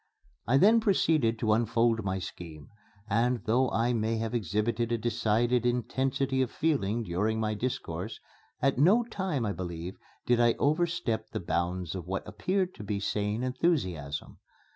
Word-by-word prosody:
I 130 +4 +4
then 215 +9 +6
proceeded 160 - +2
to 110 -1 +2
unfold 115 0 +2
my 95 -1 -1
scheme; 80 -5 -8 0.4
and, 115 +3 +1
though 125 +3 +2
I 115 +2 +1
may 115 0 0
have 115 +1 -3
exhibited 115 +2 -1
a 120 - +2
decided 115 +1 +1
intensity 130 +2 0
of 130 - 0
feeling 120 -8 0
during 105 +4 -1
my 110 -1 0
discourse, 105 -4 -4 0.4
at 135 -2 +2
no 200 +11 +5
time, 190 - -2
I 105 - 0
believe, 85 0 -6 0.3
did 120 -1 +3
I 120 -1 +5
overstep 155 -6 0
the - - -4
bounds 90 -1 -2
of 90 -3 -6
what 95 +3 -3
appeared 185 - -1
to - - -9
be 100 0 -2
sane 105 +3 -1
enthusiasm. 125 - -1
115 Hz, 155 wpm, -29 LUFS, 105-130 Hz, 0.4 s, then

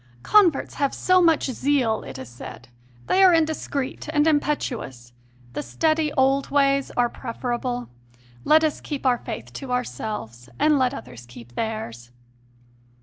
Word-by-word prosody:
"Converts 370 -9 +4
have 280 - +1
so 370 0 +3
much 330 -3 +4
zeal," 255 -4 +1
it - - -9
is 130 -1 -8
said; 120 0 -11 0.4
"they 385 - +3
are 365 -3 +7
indiscreet 305 -3 -2
and 295 -1 +3
impetu 295 -5 +1
ous. 120 -2 -12 0.4
The - - -3
steady 310 - 0
old 270 +1 +2
ways 275 -1 +2
are 245 0 +4
preferable; 245 0 -4 0.6
let 315 +1 +5
us 310 -2 0
keep 285 -3 -5
our 245 -2 +3
faith 120 +1 -7
to 260 - -7
ourselves, 210 - -4
and 300 -2 +3
let 255 +1 +1
others 125 - -10
keep 120 0 -13
theirs." 120 - -4
255 Hz, 145 wpm, -24 LUFS, -, 0.6 s, are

